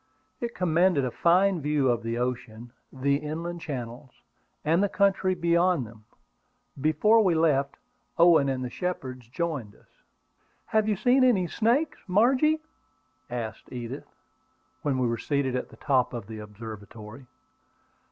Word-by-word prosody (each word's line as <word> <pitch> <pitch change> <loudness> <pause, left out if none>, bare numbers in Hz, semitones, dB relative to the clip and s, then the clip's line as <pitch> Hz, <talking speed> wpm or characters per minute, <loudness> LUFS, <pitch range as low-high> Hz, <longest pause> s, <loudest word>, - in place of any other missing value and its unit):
It 235 0 -4
commanded 175 -4 +2
a 125 - -2
fine 180 +4 +3
view 145 -2 +1
of 120 -1 +1
the 115 0 -3
ocean, 120 -2 -4 0.2
the 140 +1 +1
inland 165 +4 -5
channels, 130 -4 -6 0.6
and 165 +4 +3
the 205 - +2
country 195 -2 +2
beyond 170 -3 +2
them. 110 -1 -15 0.8
Before 210 +9 +4
we 180 -4 +2
left, 140 -4 +2 0.4
Owen 165 -5 +5
and 130 -1 -2
the - - -4
Shepards 130 -9 -5
joined 140 -8 -3
us. - - -24 0.8
"Have 220 0 +1
you 210 - +2
seen 250 +6 +3
any 225 -8 +4
snakes, 235 - 0
Margie?" 260 +11 +3 0.7
asked 120 -3 -6
Edith, 125 +2 -6 0.7
when 140 -3 0
they 130 - +1
were 115 -1 -1
seated 140 -2 -1
at 125 - -3
the - - -16
top 130 -5 +1
of 115 -4 -6
the 110 +1 -8
observatory. 105 +3 -10
145 Hz, 140 wpm, -27 LUFS, 125-180 Hz, 0.8 s, Owen